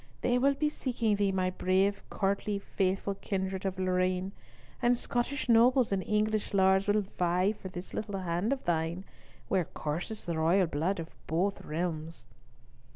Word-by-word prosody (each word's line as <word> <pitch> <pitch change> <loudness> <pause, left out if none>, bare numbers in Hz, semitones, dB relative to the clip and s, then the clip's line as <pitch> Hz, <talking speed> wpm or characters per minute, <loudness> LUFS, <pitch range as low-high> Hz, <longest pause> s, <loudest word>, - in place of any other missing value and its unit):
They 245 0 +2
will 275 +2 +3
be 300 +2 +1
seeking 240 -7 0
thee, 200 -1 +2
my 185 -1 0
brave 190 +2 +1
courtly 200 +1 0
faithful 195 0 -1
kindred 190 -1 -3
of 190 0 -3
Lorraine, 185 0 0 0.5
and 240 0 +3
Scottish 245 +5 -2
nobles 240 +1 +5
and 195 -1 +1
English 215 0 0
lords 190 0 +4
will 210 +1 +3 0.2
vie 180 +3 +2
for 205 -3 -8
this 180 0 -8
little 205 -2 -3
hand 180 +5 -1
of 275 -1 -2
thine, 170 +2 0 0.4
where 185 -3 +1
courses 170 +11 -4
the 170 -3 -2
royal 175 +4 +4
blood 165 +4 -1
of 165 0 -6 0.2
both 185 +6 0
realms." 160 -4 -3
190 Hz, 155 wpm, -30 LUFS, 180-210 Hz, 0.5 s, nobles